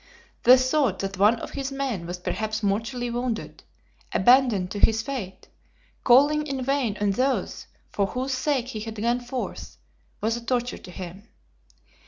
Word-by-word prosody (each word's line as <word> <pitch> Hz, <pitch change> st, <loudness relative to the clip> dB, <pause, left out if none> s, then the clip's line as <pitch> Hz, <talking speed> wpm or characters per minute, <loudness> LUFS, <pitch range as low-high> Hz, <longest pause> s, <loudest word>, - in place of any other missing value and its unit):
The 255 Hz, +2 st, +8 dB
thought 255 Hz, -5 st, +1 dB
that 195 Hz, -1 st, -4 dB
one 210 Hz, +4 st, +5 dB
of -, -, -7 dB
his 275 Hz, -1 st, -4 dB
men 260 Hz, -11 st, -3 dB
was 175 Hz, +1 st, -4 dB
perhaps 215 Hz, +4 st, -3 dB
mortally 225 Hz, +5 st, -1 dB
wounded, 240 Hz, -1 st, -3 dB, 0.5 s
abandoned 220 Hz, -4 st, +4 dB
to 205 Hz, -, -4 dB
his 225 Hz, +1 st, +3 dB
fate, 230 Hz, -8 st, -6 dB, 0.6 s
calling 290 Hz, +4 st, +5 dB
in 270 Hz, -2 st, -3 dB
vain 255 Hz, -6 st, 0 dB
on 205 Hz, -1 st, +2 dB
those 260 Hz, +6 st, -1 dB, 0.2 s
for 200 Hz, -1 st, 0 dB
whose 260 Hz, +5 st, -3 dB
sake 255 Hz, -1 st, 0 dB
he 220 Hz, -, -5 dB
had 220 Hz, +1 st, -6 dB
gone 235 Hz, +3 st, 0 dB
forth, 245 Hz, +1 st, -6 dB, 0.4 s
was 225 Hz, +2 st, 0 dB
a 235 Hz, -, -6 dB
torture 245 Hz, 0 st, -1 dB
to -, -, -12 dB
him. 185 Hz, +3 st, -9 dB
235 Hz, 160 wpm, -25 LUFS, 205-260 Hz, 0.6 s, The